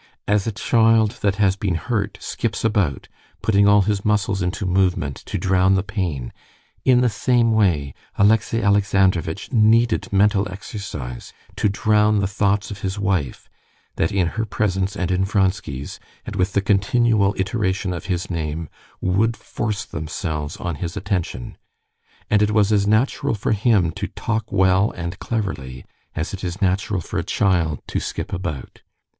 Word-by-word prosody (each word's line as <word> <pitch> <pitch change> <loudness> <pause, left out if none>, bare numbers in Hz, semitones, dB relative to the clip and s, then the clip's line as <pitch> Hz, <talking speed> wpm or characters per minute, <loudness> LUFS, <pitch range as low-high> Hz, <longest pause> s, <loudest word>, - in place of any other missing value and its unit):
As 105 0 +1
a - - 0
child 110 0 +2
that 100 -1 +1
has 100 -2 +2
been 95 -3 -1
hurt 105 +2 -2
skips - - -3
about, 100 - 0 0.4
putting 100 -2 +4
all 105 -1 +6
his 100 0 -1
muscles 105 -1 +1
into 95 +3 -2
movement 90 -6 +1
to - - -2
drown 95 0 +3
the 95 - +1
pain, 90 - -3 0.5
in 125 -2 +4
the 125 - +3
same 120 +1 +2
way 85 -11 +2 0.2
Alexey 110 +2 +3
Alexandrovitch 95 -3 +1
needed 115 0 +3
mental 100 0 +2
exercise 90 - -7 0.2
to 105 - +1
drown 105 +1 +2
the 100 - +1
thoughts 100 0 0
of 100 -1 -7
his 95 +1 -3
wife 95 -10 -1 0.5
that 80 - +1
in 95 -3 +2
her 110 - -2
presence 100 -2 -1
and 90 0 -1
in 90 +1 +1
Vronsky's, 95 -8 -1 0.3
and - - -6
with 95 +2 0
the 100 - +2
continual 100 +1 +2
iteration 95 -1 -1
of 85 - -6
his 90 -2 -2
name, 80 -2 -4 0.3
would 105 +5 +1
force 105 -3 -3
themselves 75 0 -4
on 85 -4 -4
his 85 +4 -5
attention. 95 - -3 0.7
And 105 -1 +3
it 105 - +3
was 105 -1 +3
as 100 -1 +2
natural 115 +4 +1
for 105 - -2
him 105 -5 +3
to - - -4
talk 110 -1 -3
well 95 +1 +3
and 85 +2 -5
cleverly, 65 - -4 0.3
as 80 - -3
it 100 - -6
is 90 +1 -4
natural 95 0 0
for - - -4
a - - -2
child 85 -6 0
to - - -1
skip - - -5
about. 75 -8 -5
100 Hz, 160 wpm, -21 LUFS, 90-105 Hz, 0.7 s, all